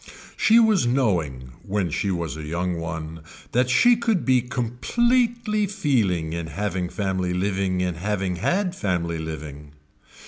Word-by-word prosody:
She 225 - +4
was 215 - +4
knowing, 85 - 0
when 95 -4 -2
she 100 - -1
was 85 -4 -2
a 80 - -7
young 85 +3 -2
one, 80 -1 -5 0.3
that 125 +2 +2
she 240 - +5
could 225 -6 0
be 130 -2 +4
completely 215 - 0
feeling 105 - 0
in 85 -1 -4
having 95 +1 -3
family 95 -3 -2
living 95 -1 0
in 90 -1 0
having 95 0 -2
had 185 - 0
family 85 - -1
living. 75 -2 -7
95 Hz, 140 wpm, -24 LUFS, 85-130 Hz, 0.3 s, she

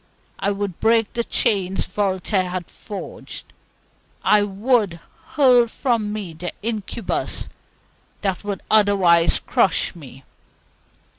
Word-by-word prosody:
I 200 - 0
would 200 -3 -3
brake 225 -1 +2
the 235 0 -1
chains 195 -6 +1
Voltaire 190 -1 -1
had 180 -1 -5
forged; 205 -2 -9 0.7
I 210 - +5
WOULD 205 -2 +1 0.4
hurl 250 -5 +6
from 230 -3 -1
me 205 -6 -5
the 175 +3 -5
incubus 220 0 -3 0.7
that 195 -3 -2
would 200 -2 -4
otherwise 195 -6 +4
crush 190 - +1
me. 135 -5 -13
205 Hz, 105 wpm, -22 LUFS, 185-220 Hz, 0.7 s, hurl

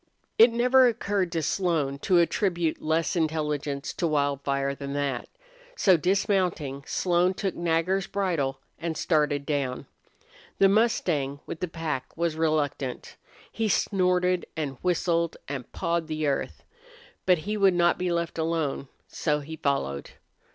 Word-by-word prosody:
It 230 +2 +8
never 250 +2 +5
occurred 205 -6 -1
to 165 -2 -1
Slone 155 -5 0
to 180 +4 +2
attribute 170 -1 +1
less 160 +3 0
intelligence 150 -3 -1
to 170 - -1
Wildfire 140 -2 0
than 140 0 -6
that. 140 -3 -2 0.5
So, 190 - +5
dismounting, 180 -6 0
Slone 180 +1 +1
took 195 -1 -2
Nagger's 175 +3 0
bridle 160 -9 -1 0.2
and 165 -2 -3
started 150 -3 +1
down. 140 -4 -2 0.7
The 195 - +6
mustang 180 - +1
with 160 - -6
the 180 - -2
pack 160 -5 -4
was 170 -1 0
reluctant. 150 -5 -1 0.4
He 225 -1 -1
snorted 180 -2 +1
and 140 -4 -3
whistled 170 -2 0
and 135 -3 -6
pawed 170 -2 -1
the 155 -1 -2
earth. 140 -2 -2 0.6
But 180 -1 +6
he 210 +1 -1
would 195 -3 +4
not 175 0 +3
be 180 -1 0
left 170 -1 -2
alone, 160 -4 -1 0.2
so 150 -2 -1
he 160 +3 -7
followed. 70 - -2
165 Hz, 135 wpm, -26 LUFS, 145-180 Hz, 0.7 s, It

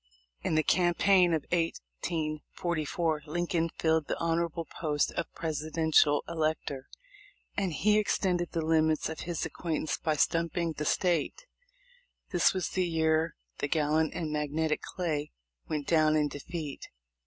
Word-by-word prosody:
In - - 0
the 155 - +3
campaign 180 +1 +4
of 160 -3 0
lSLt 165 -2 -2 0.8
Lincoln 170 +1 0
filled 160 -2 +2
the - - -2
hon 165 0 +1
orable 170 -1 -3
post 150 -3 -1
of 170 - -3
Presidential 155 -1 +2
Elector, 155 -4 -2 0.7
and 195 -3 0
he 210 +7 +3
extended 180 -4 0
the 165 -2 -1
limits 160 -1 +2
of 160 - -6
his 170 -2 -3
acquaintance 160 -2 -2
by 155 -1 0
stumping 165 +2 +1
the 150 - -4
State. 175 - 0 0.9
This 175 -2 +4
was 185 -3 -2
the 185 -1 0
year 160 -1 +1 0.2
the - - 0
gallant 155 +1 +1
and 160 -3 -2
magnetic 150 +1 0
Clay 155 -5 -3 0.4
went 150 -2 -2
down 155 -1 +4
in 150 -1 +2
defeat. 150 -1 -6
160 Hz, 135 wpm, -30 LUFS, 155-170 Hz, 0.9 s, campaign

